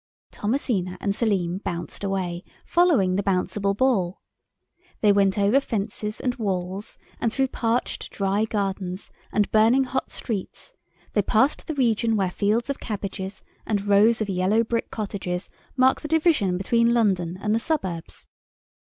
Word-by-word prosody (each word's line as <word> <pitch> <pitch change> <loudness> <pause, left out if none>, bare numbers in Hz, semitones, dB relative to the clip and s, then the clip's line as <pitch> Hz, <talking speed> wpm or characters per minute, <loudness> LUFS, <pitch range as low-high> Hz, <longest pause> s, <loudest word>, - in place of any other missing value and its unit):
Thomasina 205 -6 -1
and 200 -1 -1
Selim 190 -6 0
bounced 170 -2 -5
away, 185 -3 -2 0.2
following 300 - +3
the - - +2
Bouncible 195 +1 0
Ball. 200 -9 +1 0.8
They 210 - +5
went 200 -1 +3
over 205 +6 +4
fences 215 -3 -4
and 250 - 0
walls, 190 -2 -3 0.2
and 230 - 0
through 265 +1 +1
parched, 235 0 -1
dry 200 +2 0
gardens 195 -3 -3 0.2
and 210 -1 +1
burning 225 +5 +5
hot 260 0 -3
streets; 225 - -5 0.4
they 205 - +3
passed 220 +8 +1
the 315 - -3
region 230 -3 +2
where 190 -3 +1
fields 215 +5 +1
of 280 - -3
cabbages 195 -2 -5 0.2
and 205 -2 -1
rows 210 +3 +4
of 215 - 0
yellow 190 +4 +2
brick 230 0 -2
cottages 195 -4 -4 0.3
mark 260 +1 +4
the - - -5
division 300 - +2
between 230 +5 +2
London 185 -6 +1
and 210 +1 0
the 225 - +2
suburbs. 190 - -3
205 Hz, 145 wpm, -24 LUFS, 190-235 Hz, 0.8 s, They